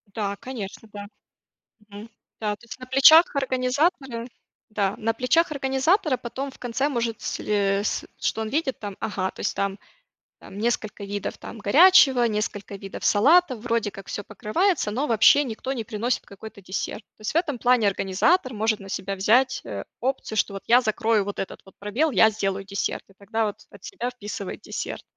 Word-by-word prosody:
Да, 200 -2 -2
конечно, 225 -4 -8
да. 205 0 -7 0.8
Мгм. 205 +2 -10 0.3
Да, 210 -1 -1
то 235 - -19
есть 235 - -10
на 255 - -9
плечах 285 +6 +7
организатора 260 -1 0 0.4
да, 200 -2 0
на 225 +1 -1
плечах 265 +8 +2
организатора 275 +3 +1
потом 260 +3 -5
в - - -18
конце 250 +4 -1
может 235 -4 -2
сле 200 -1 0
с - - -1
что 225 - -1
он 220 - -2
видит, 280 -1 -1
там, 205 -2 -6
ага, 200 -4 -2
то - - -14
есть - - -1
там 195 0 -1 0.6
там 195 - -11
несколько 215 -2 -2
видов, 205 0 -4
там, - - -9
горячего, 265 - +6
несколько 210 -2 -3
видов 195 -1 -6
салатов, 270 +3 +4
вроде 230 -3 -1
как 195 -1 -11
всё 205 - -5
покрывается, 255 - 0
но 265 +8 -1
вообще 235 +5 +5
никто 255 +1 -4
не 245 -4 -3
приносит 225 +3 -2
какой-то 200 +1 -11
десерт. 190 +3 -4
То - - -18
есть 215 - -2
в - - -4
этом 300 -7 0
плане 245 -3 +3
организатор 200 - +1
может 215 0 0
на 195 -1 -11
себя 195 +1 -3
взять, 245 +7 +3
э, 100 -1 -6 0.2
опцию, 255 -3 -2
что 200 - +1
вот 195 - -7
я 245 +2 +6
закрою 220 -2 +1
вот 205 - -6
этот 195 - -6
вот 190 - -17
пробел, 235 +11 0
я 220 -2 +6
сделаю 195 -2 -2
десерт, 200 0 -2
и 195 - -21
тогда 220 +3 -2
вот 205 - -4
от 200 - -16
себя 245 +3 -4
вписывает 205 -5 -7
десерт. - - -6
225 Hz, 185 wpm, -24 LUFS, 205-260 Hz, 0.8 s, плечах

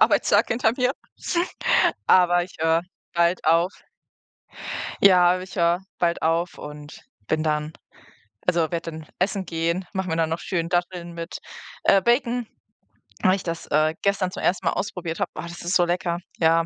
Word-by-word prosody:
Arbeitstag - - +4
hinter 225 -2 +2
mir, 250 0 +2 1.1
aber 175 -1 +5
ich 180 - -15
höre 165 +1 +3 0.3
bald 170 +1 +2
auf. 165 +3 +4 1.3
Ja, 180 -2 +7
aber 185 - -4
ich 185 - -10
höre 170 +1 +2 0.2
bald 170 -1 0
auf 165 +2 0
und 150 0 -10 0.2
bin 155 0 0
dann 150 0 -1 0.8
also, 175 -1 +3
werde 170 -1 -3
dann 155 -1 -9
essen 190 0 -1
gehen, 170 +2 -1
mache 190 -1 -2
mir 160 - -1
dann 160 -1 +1
noch 165 +1 -2
schön 170 -2 -2
Datteln 175 -1 -2
mit, 170 +1 -6 0.4
äh, 195 - +6
Bacon, 240 +1 +2 0.8
weil 185 +1 +4
ich 195 - -6
das, 165 -1 -4
äh, 155 +1 +2
gestern 200 -2 +1
zum - - -6
1. 175 0 0
Mal - - +4
ausprobiert 180 -5 -4
habe. - - 0
Oh, - - -4
das 170 0 -8
ist 175 +2 -1
so 175 - +5
lecker, 175 0 -1 0.2
ja. 165 0 +3
175 Hz, 170 wpm, -24 LUFS, 165-185 Hz, 1.3 s, Ja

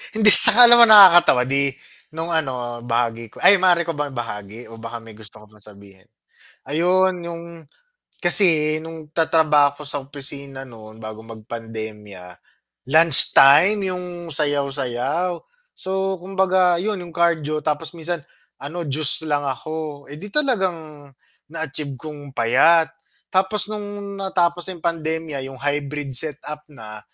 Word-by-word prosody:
Hindi 215 -1 +5
'tsaka 245 +3 +8
alam 240 0 +8
mo - - +9
nakakatawa 180 -11 +7
di 140 +2 0 0.5
nung 165 +1 -5
ano, 125 -6 -3
bahagi 115 -1 -3
ko - - -14
ay 200 - +6
maaari 180 -2 +2
ko 165 - -4
bang 145 -2 -4
ibahagi 110 -1 -8
o 115 - -12
baka 115 +1 -9
may 115 - -13
gusto 110 0 -15
ka - - -17
pang 105 0 -22
sabihin? 100 -2 -15 0.6
Ayun 185 +4 +1
'yung, 170 0 -8 0.8
kasi 165 -4 +3
nung 160 -2 -11
tatrabaho 150 -3 +1
ako 150 - -10
sa 145 -1 -4
opisina 140 -1 -8
no'n 110 -1 -15
bago 110 0 -10
magpandemya, 110 -4 -10 0.6
lunch 160 -2 +7
time 185 +9 +4
'yung 180 -2 -7
sayaw-sayaw, 140 +3 -2 0.3
so 190 0 -4
kumbaga 185 -1 0
'yun 210 -1 -3
'yung 175 -2 -12
cardio 155 -3 -1
tapos 155 +2 -3
minsan 170 0 -4 0.4
ano 165 +4 -6
juice 150 +2 +1
lang 145 -1 -1
ako, 150 +2 -7
eh 145 - -9
di 205 - -8
talagang 180 - -3 0.4
na-achieve 150 -3 -5
kong 145 0 -11
payat. 150 +8 +3 0.5
Tapos 190 +3 +1
nung 205 -1 -8
natapos 175 -2 -1
ng 180 -3 -9
pandemya 160 -3 -3
'yung 135 - -11
hybrid 145 +1 -4
set-up 150 +2 -4
na, 110 -6 -12
150 Hz, 140 wpm, -20 LUFS, 130-175 Hz, 0.8 s, mo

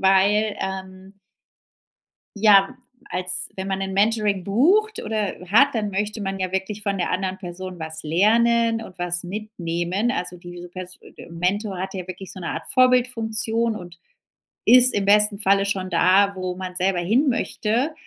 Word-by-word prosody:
weil, 200 +2 +3
ähm 190 0 -7 1.2
ja 200 +2 +5 0.3
als 185 0 -1
wenn 190 0 -4
man 195 0 -2
'n 190 0 -3
Mentoring 205 -2 +1
bucht 370 - +2
oder 215 -2 -2
hat 230 +8 +6
dann 210 -3 -1
möchte 210 +3 -3
man 195 -1 -3
ja 185 -1 -3
wirklich 190 +2 -3
von 200 -1 -1
der 175 - -1
anderen 190 0 -2
Person 180 0 -8
was 160 -1 -7
lernen 225 +7 +2
und 185 -4 -12
was 175 0 -1
mitnehmen. 185 +1 -3
Also 180 -7 -3
diese 175 0 -10
pers 185 +1 -8
e - - -14
Mentor 185 +3 -2
hat 190 +1 -5
ja 185 -2 -5
wirklich 185 +1 -8
so - - -10
'ne 170 - -5
Art - - -5
Vorbildfunktion 230 -3 +1
und 175 -3 -11 0.7
ist 250 +1 +7
im 205 - 0
besten 210 0 +4
Falle 195 -1 +3
schon 190 -2 -2
da 195 +3 +3
wo 185 -1 -3
man 185 0 -7
selber 185 0 0
hinmöchte. 235 - 0
195 Hz, 160 wpm, -22 LUFS, 185-215 Hz, 1.2 s, ist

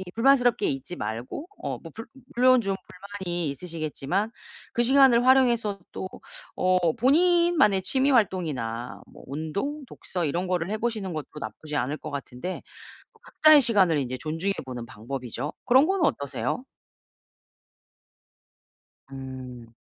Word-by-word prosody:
불만스럽게 245 -2 +4
있지 135 +6 -4
말고 115 - -5 0.2
어 - - -2
뭐 - - -11
불 225 - -8 0.3
물론 255 0 +5
좀 195 -2 -1
불만이 180 -4 -5
있으시겠지만 165 - -3 0.4
그 240 - +2
시간을 255 -1 +5
활용해서 240 -6 +3
또 190 - -4 0.5
어 185 -3 +2
본인만의 330 - +4
취미 270 +6 +2
활동이나 145 - -1
뭐 - - -14
운동, 200 - -4
독서 180 -2 -5
이런 175 +5 -1
거를 180 +1 -1
해 215 - -1
보시는 215 -5 -2
것도 155 -2 -6
나쁘지 150 +8 -6
않을 145 +4 -1
것 155 - -8
같은데 140 +5 -5 0.5
뭐 - - -26
각자의 310 -1 +6
시간을 195 - +4
인제 130 -1 -3
존중해 165 +7 -2
보는 125 -2 -6
방법이죠. 125 +4 -5
그런 260 +4 +6
건 385 0 +1
어떠세요? 140 - -2 2.5
음. 130 -3 -9
185 Hz, 285 characters per minute, -26 LUFS, -, 2.5 s, 각자의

